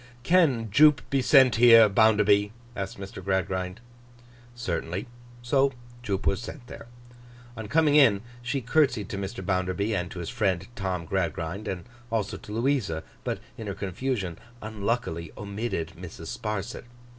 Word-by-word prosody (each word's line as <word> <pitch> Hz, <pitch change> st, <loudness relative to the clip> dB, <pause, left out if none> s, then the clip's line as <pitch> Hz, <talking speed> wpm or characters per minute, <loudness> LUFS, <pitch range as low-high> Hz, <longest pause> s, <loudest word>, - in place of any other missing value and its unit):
'Can 135 Hz, -, +3 dB
Jupe 150 Hz, +4 st, +5 dB
be 135 Hz, -1 st, +2 dB
sent 130 Hz, -3 st, +5 dB
here, 115 Hz, -2 st, +8 dB
Bounderby?' 105 Hz, -1 st, +4 dB, 0.2 s
asked 100 Hz, -1 st, -5 dB
Mr. 95 Hz, -1 st, -8 dB
Gradgrind. 95 Hz, +1 st, -2 dB, 0.7 s
Certainly. 90 Hz, -4 st, -3 dB, 0.4 s
So 135 Hz, +2 st, +2 dB, 0.3 s
Jupe 100 Hz, -5 st, -3 dB
was 100 Hz, 0 st, +1 dB
sent 130 Hz, -5 st, -8 dB
there. -, -, -11 dB, 0.7 s
On 110 Hz, -2 st, -6 dB
coming 155 Hz, +4 st, +3 dB
in, 115 Hz, -9 st, +5 dB, 0.2 s
she 125 Hz, +3 st, -2 dB
curtseyed 125 Hz, -, +1 dB
to 100 Hz, -, -4 dB
Mr. 95 Hz, 0 st, -5 dB
Bounderby, 95 Hz, +3 st, 0 dB
and 90 Hz, -2 st, -2 dB
to -, -, -9 dB
his 85 Hz, -, -4 dB
friend 95 Hz, -6 st, 0 dB
Tom 95 Hz, -4 st, -3 dB
Gradgrind, 85 Hz, +2 st, -2 dB
and 90 Hz, -1 st, -4 dB, 0.3 s
also 110 Hz, -3 st, -1 dB
to -, -, -12 dB
Louisa; 115 Hz, -, 0 dB, 0.2 s
but -, -, -2 dB, 0.2 s
in 110 Hz, -, -6 dB
her 100 Hz, -, -3 dB
confusion 100 Hz, -2 st, -3 dB, 0.2 s
unluckily 105 Hz, -6 st, -3 dB
omitted 105 Hz, -3 st, -4 dB
Mrs. -, -, -8 dB
Sparsit. 105 Hz, +1 st, -4 dB
105 Hz, 145 wpm, -27 LUFS, 95-120 Hz, 0.7 s, here